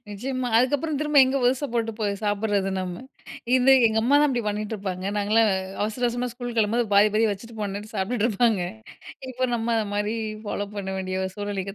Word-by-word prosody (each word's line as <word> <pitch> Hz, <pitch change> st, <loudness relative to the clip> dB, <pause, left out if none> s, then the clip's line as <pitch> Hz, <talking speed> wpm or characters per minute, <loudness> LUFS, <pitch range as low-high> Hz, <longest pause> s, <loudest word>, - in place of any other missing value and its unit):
நிச்சியமா. 250 Hz, +5 st, -3 dB
அதுக்கப்புறம் 285 Hz, +5 st, +1 dB
திரும்ப 300 Hz, -1 st, -1 dB
எங்கே 265 Hz, +1 st, 0 dB
புதுசா 255 Hz, +3 st, +2 dB
போட்டு 230 Hz, -1 st, -1 dB
போய் 205 Hz, -2 st, 0 dB
சாப்பிடுறது 205 Hz, -1 st, 0 dB
நம்ம. 180 Hz, +4 st, -5 dB, 0.5 s
இது 260 Hz, +1 st, +5 dB
எங்க 220 Hz, 0 st, +1 dB
அம்மாதான் 285 Hz, +4 st, +4 dB
இப்டி 245 Hz, -3 st, -1 dB
பண்ணிகிட்டுருப்பாங்க. 205 Hz, -3 st, -3 dB
நாங்கலாம் 215 Hz, +2 st, +3 dB, 0.3 s
அவசர 220 Hz, +4 st, -2 dB
அவசரமா 245 Hz, +1 st, -2 dB
ஸ்கூல் 245 Hz, 0 st, -6 dB
கிளம்பும்போது, 220 Hz, 0 st, +1 dB
பாதி 205 Hz, +1 st, +6 dB
பாதி 225 Hz, +1 st, +3 dB
வச்சுட்டு 225 Hz, +3 st, -7 dB
போணும்ட்டு 205 Hz, +1 st, -5 dB
சாப்பிட்டுட்டு 205 Hz, +3 st, 0 dB
இருப்பாங்க. 220 Hz, -2 st, +2 dB, 0.7 s
இப்போ 255 Hz, 0 st, -1 dB
நம்ம 230 Hz, 0 st, 0 dB
அந்த 220 Hz, -1 st, 0 dB
மாரி 205 Hz, +2 st, -1 dB, 0.3 s
ஃபாலோ 205 Hz, -1 st, -3 dB
பண்ண 195 Hz, -1 st, -4 dB
வேண்டிய 190 Hz, 0 st, -2 dB
சூழ்நிலைக்கு 200 Hz, -1 st, -4 dB
220 Hz, 170 wpm, -24 LUFS, 205-245 Hz, 0.7 s, பாதி